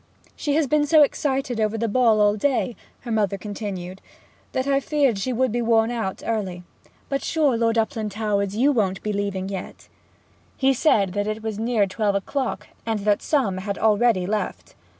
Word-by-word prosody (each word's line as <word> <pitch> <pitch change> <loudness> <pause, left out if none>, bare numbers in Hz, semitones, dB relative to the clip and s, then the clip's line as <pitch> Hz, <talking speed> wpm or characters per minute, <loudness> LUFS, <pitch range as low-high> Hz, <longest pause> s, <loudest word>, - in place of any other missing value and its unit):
'She 290 -1 -1
has 315 -1 +3
been 295 +2 +2
so 300 +1 +6
excited 270 -4 -1
over 215 0 0
the 230 +1 -1
ball 225 -1 +3
all 205 0 +4
day,' 250 +1 0 0.3
her 240 - -6
mother 205 -3 +1
continued, 195 -2 -6 0.5
'that 260 - -1
I 275 0 +2
feared 275 -7 +1
she 255 +6 -2
would 255 0 +1
be 240 +2 -1
worn 230 0 +3
out 225 -6 -3
early... 195 -6 -2 0.4
But 275 0 -2
sure, 300 -6 +2
Lord 230 0 +1
Uplandtowers, 210 -2 -1
you 265 +6 +3
won't 195 -7 0
be 210 - -2
leaving 200 -2 -2
yet?' 190 -2 -7 0.7
He 270 0 +3
said 205 - +2
that 205 +1 -1
it 215 +1 -3
was 220 -2 -4
near 225 -2 +2
twelve 200 +1 -1
o'clock, 255 +6 -2 0.2
and 220 -2 -2
that 205 0 +2
some 240 -11 0
had 200 +1 -4
already 215 -3 +3
left. 210 +2 -3
220 Hz, 180 wpm, -23 LUFS, 200-255 Hz, 0.7 s, so